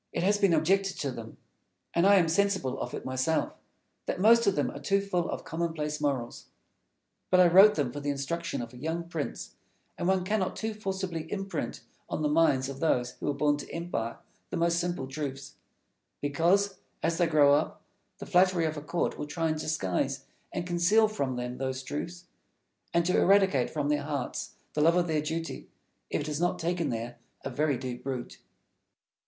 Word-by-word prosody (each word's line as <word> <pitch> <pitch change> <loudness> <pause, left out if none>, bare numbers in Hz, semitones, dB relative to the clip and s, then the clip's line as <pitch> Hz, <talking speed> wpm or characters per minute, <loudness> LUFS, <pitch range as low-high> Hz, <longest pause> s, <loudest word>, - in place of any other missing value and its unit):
It - - -2
has 205 +2 +3
been 200 -3 +4
objected 195 +5 +2
to 140 - -1
them 115 -2 -9 0.6
and 170 +3 +4
I 200 - +7
am 175 -4 +4
sensible 185 -7 +1
of - - -4
it - - -7
myself 130 +5 0 0.5
that - - -2
most 230 +3 +6
of 200 - +3
them 145 - 0
are - - -8
too 195 +8 +2
full 185 -4 -1
of - - -4
commonplace 160 -2 -3
morals. 135 -5 -2 0.8
But 185 - +5
I 180 - +8
wrote 195 +5 +8
them 140 -5 0
for 145 - -5
the 145 0 -3
instruction 140 0 -2
of 115 +1 -10
a - - -11
young 160 +5 -3
prince, 150 - -5 0.5
and 175 - -1
one 190 -1 +2
cannot 190 -1 0
too 220 0 -3
forcibly 190 -5 -4
imprint 195 -1 -3 0.3
on 155 - -2
the 150 - +2
minds 150 -4 +3
of 135 -1 -7
those 125 -6 +1
who - - -2
are - - +1
born 145 0 +2
to 145 - -8
empire 165 -9 -3 0.3
the - - -3
most 170 0 +2
simple 175 -6 -2
truths; 135 -1 -5 0.7
because, 175 +8 +2 0.2
as 165 0 0
they 175 - +4
grow 145 -3 +5
up, 145 - 0 0.3
the - - -8
flattery 180 -2 +3
of 155 -1 -2
a - - -4
court 170 +3 -2
will 150 - -4
try 165 +2 -1
to 155 - -2
disguise 125 - -1 0.3
and 175 - -3
conceal 180 +5 +4
from 140 -12 -2
them 125 0 -4
those 130 0 -3
truths, 170 +6 -5 0.7
and 170 0 +2
to 180 - +2
eradicate 190 -10 +4
from 145 -2 -2
their 150 -1 +2
hearts 140 -3 -4 0.2
the 150 - 0
love 165 +3 +5
of 180 -1 +3
their 155 -3 0
duty, 165 +2 -4 0.4
if - - -1
it - - -4
has 150 +1 -2
not 175 - +1
taken 170 -1 -1
there 120 +1 -4 0.3
a 135 - -3
very 145 +1 +1
deep 125 -1 -6
root. 130 -3 -5
160 Hz, 195 wpm, -29 LUFS, 140-180 Hz, 0.8 s, I